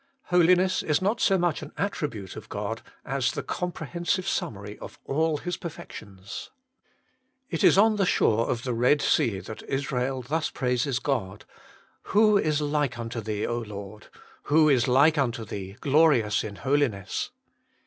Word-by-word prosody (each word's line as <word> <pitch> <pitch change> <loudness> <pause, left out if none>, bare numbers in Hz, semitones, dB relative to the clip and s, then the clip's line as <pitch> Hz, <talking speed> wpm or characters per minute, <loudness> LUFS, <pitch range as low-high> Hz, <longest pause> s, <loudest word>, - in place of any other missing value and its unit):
Holiness 180 +1 +4
is 150 -2 +1
not 205 +5 0
so 195 -2 +4
much 175 -3 0
an 150 - -9
attribute 145 - -3
of 110 - -10
God, 105 +2 -4 0.2
as 135 -1 0
the - - -4
comprehensive 175 +1 -2
summary 105 - -3
of - - -10
all 155 +2 +1
His 175 +3 -4
perfections. 100 - -9 1.0
It 165 - -1
is - - +6
on 215 +1 +5
the 195 - +2
shore 115 -7 +2
of 115 -1 -1
the 125 - -2
Red 125 +5 +3
Sea 100 -5 +2
that 110 - -8
Israel 135 -1 -1
thus 155 +5 -1
praises 125 0 0
God: 110 -9 -2 0.3
' - - -31 0.2
Who 215 -1 +6
is 155 -6 +2
like 145 -3 0
unto 115 0 -4
Thee, 105 -1 -2
O 120 0 -1
Lord! 105 -1 -8 0.4
Who 155 +1 +4
is 125 -5 +3
like 145 +5 +4
unto 120 -4 -1
Thee, 100 -1 -7
glorious 140 -8 +3
in 105 -2 -6
holi 145 +5 +2
ness 100 -5 -4
135 Hz, 160 wpm, -26 LUFS, 110-160 Hz, 1.0 s, is